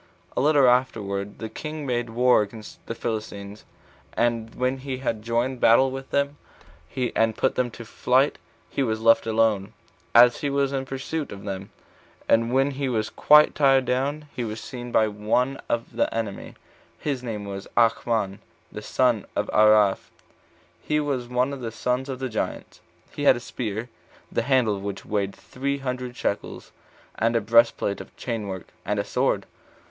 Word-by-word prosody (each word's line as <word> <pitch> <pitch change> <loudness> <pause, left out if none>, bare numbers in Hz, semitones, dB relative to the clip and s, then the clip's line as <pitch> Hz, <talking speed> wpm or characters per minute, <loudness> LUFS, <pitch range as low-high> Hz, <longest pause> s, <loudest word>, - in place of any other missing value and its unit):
A - - +1
little 145 -2 +5
afterward 105 -6 0
the 110 - -5
king 155 +5 -6
made 120 -2 -1
war 125 +1 +4
against 105 +1 -8
the 115 - -4
Philistines; 105 -3 -5 0.5
and 115 -1 0
when 130 +1 0
he 130 -1 -4
had 115 -4 -2
joined 120 +3 -1
battle 130 +4 +5
with 135 0 -7
them, 140 +1 0 0.8
and 115 -1 +2
put 130 - +2
them 125 -1 0
to 115 0 -10
flight, 130 +5 +1 0.3
he - - -3
was 110 -4 0
left 115 0 +4
alone, 110 -3 +1 0.4
as 120 +1 +8
he 145 - -1
was 140 0 0
in 135 -1 -2
pursuit 140 +3 -4
of 100 - -9
them; 95 -1 -5 0.6
and 115 +1 +3
when 135 +2 +2
he 135 -1 -2
was 110 -3 -1
quite 150 0 +6
tired 135 -2 +4
down, 140 +5 -1
he 125 - -2
was 110 -1 -4
seen 120 +1 -7
by 110 - +4
one 110 +6 0
of 115 0 -2
the - - +1
enemy, 110 -3 -4 0.4
his 140 -4 -3
name 110 -4 -5
was 100 0 -6
Achmon, 115 -3 +2 0.3
the 105 - -7
son 120 -1 +1
of - - -1
Araph, 105 -2 +4 0.7
he 150 0 0
was 135 -5 -2
one 125 +3 0
of 135 - -7
the 115 -2 -4
sons 125 +4 -2
of 130 - -3
the 130 0 -3
giants. 110 -3 -4 0.3
He 145 - -3
had 130 - +7
a - - -4
spear, 115 -2 -4 0.4
the - - +1
handle 130 -6 +2
of - - -8
which 100 -1 -5
weighed 100 -2 -1
three 140 +2 -3
hundred 125 -2 -4
shekels, 100 - -3 0.5
and 115 +1 +2
a - - +4
breastplate 115 -2 +3
of - - -14
chain 115 -4 -3
work, 95 -2 -6
and - - -1
a - - +1
sword. - - 0
120 Hz, 175 wpm, -25 LUFS, 110-130 Hz, 0.8 s, as